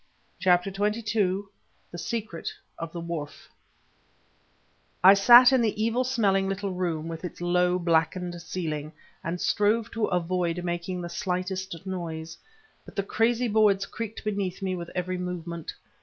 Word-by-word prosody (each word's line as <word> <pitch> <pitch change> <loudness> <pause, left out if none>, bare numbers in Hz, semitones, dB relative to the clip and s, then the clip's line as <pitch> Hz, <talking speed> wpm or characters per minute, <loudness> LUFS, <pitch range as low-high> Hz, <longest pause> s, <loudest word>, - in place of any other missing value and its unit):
CHAPTER 180 +1 +3
XXII 210 -1 0 0.5
THE 175 - -7
SECRET 215 -6 -4 0.3
OF 165 -1 -5
THE 170 - -6
WHARF 165 -4 -6 1.5
I 190 +2 +10
sat 240 +6 +8
in 260 - +4
the 215 -2 0
evil 230 +3 +1
smelling 200 -7 +1
little 195 0 -2
room 170 -4 -2
with 165 0 -6
its 180 - -6
low, 180 +1 +2
blackened 175 +1 0
ceiling, 155 -4 -4 0.3
and 170 +2 -3
strove 215 +4 +1
to 225 -2 0
avoid 180 0 -1
making 175 +1 -3
the 175 - -5
slightest 185 0 -3
noise; 165 -4 -5 0.5
but - - -14
the 200 - 0
crazy 230 +4 +1
boards 205 -3 +3
creaked 225 0 -6
beneath 200 -3 -2
me 185 -1 -1
with 170 -1 -6
every 180 0 -2
movement. 170 -2 -5
185 Hz, 140 wpm, -27 LUFS, 170-205 Hz, 1.5 s, I